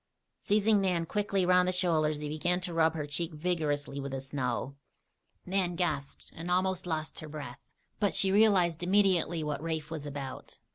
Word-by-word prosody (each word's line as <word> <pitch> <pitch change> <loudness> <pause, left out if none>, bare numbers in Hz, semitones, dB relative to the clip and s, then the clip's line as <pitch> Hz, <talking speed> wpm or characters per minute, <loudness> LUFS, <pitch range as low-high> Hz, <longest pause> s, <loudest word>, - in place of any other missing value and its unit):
Seizing 210 0 +3
Nan 180 -3 +1
quickly 200 0 0
around 180 0 +4
the - - +2
shoulders 155 -5 +1
he 150 - -3
began 175 +4 0
to 180 -2 -3
rub 165 -1 +3
her 150 -2 -2
cheek 160 +3 -2
vigorously 150 -4 -1
with 140 0 -5
the 135 - -2
snow. 135 -1 -3 0.7
Nan 180 -2 0
gasped 150 -6 -3
and 165 +2 -6
almost 185 0 +1
lost 155 -2 -2
her 155 - -7
breath; 145 -5 -7 0.4
but 205 -1 +1
she 190 - +3
realized 190 -6 +4
immediately 180 -3 +2
what 150 -1 -3
Rafe 160 -1 -3
was 150 -3 -4
about. 135 -2 -7
165 Hz, 175 wpm, -30 LUFS, 150-180 Hz, 0.7 s, around